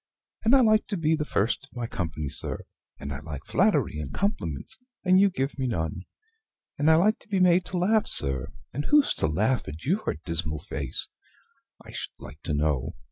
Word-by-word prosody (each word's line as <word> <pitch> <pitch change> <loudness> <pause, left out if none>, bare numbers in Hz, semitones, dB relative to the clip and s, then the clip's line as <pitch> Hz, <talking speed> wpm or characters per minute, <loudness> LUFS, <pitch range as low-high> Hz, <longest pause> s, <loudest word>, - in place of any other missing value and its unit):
And 230 +5 +5
I 265 - +6
like 215 -2 +4
to 200 - -2
be 160 -1 +2
the 150 -1 -2
first 115 +1 0
of - - -26
my 120 - -2
company, 80 -8 -4
sir; - - -3 0.4
and 70 - -5
I 70 - -5
like 75 -3 -8
flattery 75 - +2
and 70 -3 -5
compliments, 200 - -3 0.2
and 185 0 +5
you 200 0 +6
give 140 -5 -3
me 130 - 0
none; 85 -5 -3 0.7
and 145 +2 +4
I 160 - +7
like 205 +7 +3
to - - -20
be 195 -2 +1
made 180 0 +4
to 185 - -4
laugh, 210 +5 +2
sir, 65 -1 +4 0.2
and 145 +3 -3
who's 295 -1 +4
to - - +1
laugh 110 +11 0
at 75 +3 -8
YOUR 185 - 0
dismal 80 -2 -2
face, 75 - -2 0.8
I - - -11
should - - -6
like 75 - -12
to 75 - -1
know? 75 -3 0
130 Hz, 200 wpm, -27 LUFS, -, 0.8 s, I